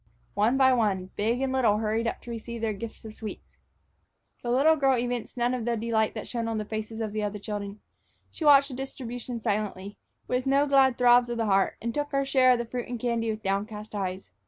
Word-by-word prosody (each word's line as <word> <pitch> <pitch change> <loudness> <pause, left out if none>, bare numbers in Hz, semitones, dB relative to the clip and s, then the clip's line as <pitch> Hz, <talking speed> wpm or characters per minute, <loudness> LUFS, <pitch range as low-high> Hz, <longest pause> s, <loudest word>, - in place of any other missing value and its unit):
One 220 +6 +2
by 260 -1 +5
one, 195 -6 0
big 230 +5 0
and 265 -1 0
little 230 -6 +3
hurried 220 +1 0
up - - -3
to 240 - -8
receive 235 0 -6
their 225 -1 0
gifts 220 +2 -8
of 220 - -8
sweets. 215 -1 -9 0.8
The 240 - -4
little 280 +6 +4
girl 270 -3 +3
evinced 245 0 -3
none 240 +1 +1
of 250 -2 -2
the 235 0 0
delight 220 -1 0
that 215 - -5
shone 235 -2 -3
on 225 -1 -2
the 215 - -3
faces 220 +1 -5
of 215 -2 -3
the 215 - -1
other 210 0 -2
children. 205 0 -6 0.5
She - - -7
watched 280 -1 +6
the - - -7
distribution 245 -2 -6
silently, 205 -2 -3 0.3
with 250 +1 -1
no 275 +2 +4
glad 270 -3 +4
throbs 245 0 +5
of 240 - -3
the 225 - 0
heart, 195 -2 +2
and 235 0 -2
took 290 0 -2
her 275 0 +1
share 260 -2 +5
of - - +1
the 235 - -3
fruit 245 +1 -5
and 245 -1 -5
candy 230 -1 -1
with 215 0 -4
downcast 210 +2 -3
eyes. 190 - -4
230 Hz, 230 wpm, -27 LUFS, 215-250 Hz, 0.8 s, watched